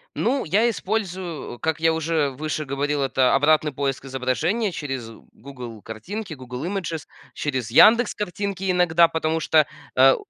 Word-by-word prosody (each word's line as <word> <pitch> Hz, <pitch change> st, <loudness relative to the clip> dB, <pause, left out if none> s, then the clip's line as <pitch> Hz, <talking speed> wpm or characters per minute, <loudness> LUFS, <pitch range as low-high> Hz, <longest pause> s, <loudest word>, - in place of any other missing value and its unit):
Ну, 265 Hz, +3 st, 0 dB
я 210 Hz, +8 st, +3 dB
использую, 185 Hz, -, -4 dB
как 160 Hz, -1 st, -1 dB
я 165 Hz, 0 st, +3 dB
уже 160 Hz, -2 st, 0 dB
выше 155 Hz, +3 st, -4 dB
говорил, 145 Hz, +1 st, -1 dB
это 130 Hz, -1 st, +2 dB
обратный 150 Hz, +1 st, +3 dB
поиск 135 Hz, -1 st, -3 dB
изображения 145 Hz, -, -1 dB
через 135 Hz, -7 st, -5 dB, 0.2 s
"Гугл 125 Hz, -4 st, -10 dB
Картинки", 170 Hz, -, -6 dB
Google 130 Hz, 0 st, -7 dB
Images, 175 Hz, -5 st, -3 dB, 0.3 s
через 130 Hz, -6 st, -3 dB
"Яндекс 230 Hz, -, +6 dB
Картинки" 195 Hz, -1 st, -2 dB
иногда, 170 Hz, -2 st, +4 dB
потому 160 Hz, 0 st, -1 dB
что, 155 Hz, -2 st, +3 dB, 0.3 s
э 135 Hz, +1 st, +6 dB
155 Hz, 140 wpm, -23 LUFS, 135-180 Hz, 0.3 s, Яндекс